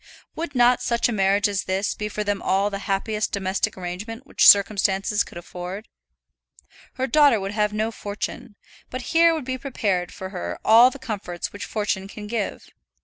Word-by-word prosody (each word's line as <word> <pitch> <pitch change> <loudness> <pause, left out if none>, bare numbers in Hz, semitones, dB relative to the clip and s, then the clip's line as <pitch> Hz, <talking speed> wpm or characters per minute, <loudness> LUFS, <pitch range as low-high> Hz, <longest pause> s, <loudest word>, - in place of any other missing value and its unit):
Would 320 -3 -5
not 245 0 +4
such 235 -1 +1
a - - -2
marriage 200 0 +2
as 200 -1 -2
this 190 +2 -1
be 210 0 -4
for 210 0 -3
them 205 -1 -2
all 200 +2 +1
the 200 - -4
happiest 210 +2 -1
domestic 190 -1 -1
arrangement 205 +8 -6
which - - +3
circumstances 200 0 +4
could - - -12
afford? 180 +4 -7 1.1
Her 260 - -1
daughter 285 -5 +4
would 195 0 -4
have 210 0 0
no 215 +2 -1
fortune, 205 -1 -6 0.3
but 255 - -5
here 335 0 +6
would 305 -5 -5
be 260 0 -3
prepared 200 -9 -2
for 190 - -7
her 85 - -5
all 230 +3 +8
the 275 - -10
comforts 205 -9 -5
which 205 - -6
fortune 200 -3 -2
can 210 +1 -9
give. 210 -1 -4
210 Hz, 180 wpm, -23 LUFS, 195-235 Hz, 1.1 s, all